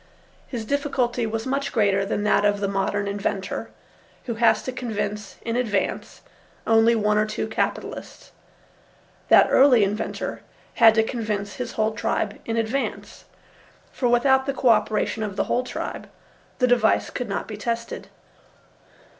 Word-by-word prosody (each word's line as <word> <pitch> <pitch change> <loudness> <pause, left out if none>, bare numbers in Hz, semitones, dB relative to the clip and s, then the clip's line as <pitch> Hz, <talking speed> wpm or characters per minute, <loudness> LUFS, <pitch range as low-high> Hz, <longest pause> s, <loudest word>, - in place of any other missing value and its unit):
His 235 -4 -5
difficulty 250 -3 0
was 225 0 -3
much 275 +1 -1
greater 200 -4 +2
than 205 +1 -2
that 210 - +3
of 205 0 +2
the 200 - -1
modern 200 +1 -1
inventor, 200 -1 -3 0.6
who 235 - -2
has 230 +1 +3
to 255 - -4
convince 210 -4 -4
in 230 0 -2
advance 215 -6 -2 0.4
only 225 +1 +4
one 210 -1 +2
or 215 - +1
two 215 - -3
capitalists. 220 - -4 1.0
That - - +8
early 260 -5 +6
inventor 205 +2 -3 0.4
had 225 -3 +7
to 220 - +4
convince 215 -4 -3
his 250 -2 -5
whole 220 0 +1
tribe 210 -1 -2
in 230 0 -2
advance, 230 +5 -3 0.7
for 250 - -1
without 265 +3 +3
the 275 - -1
co 255 - +2
operation 215 0 +1
of 205 -3 -3
the - - +1
whole 245 - 0
tribe 250 - -6 0.5
the 250 - +3
device 240 -3 +2
could 245 -3 -4
not 195 - -3
be 215 - -6
tested. 230 +2 -4
225 Hz, 150 wpm, -24 LUFS, 210-245 Hz, 1.0 s, That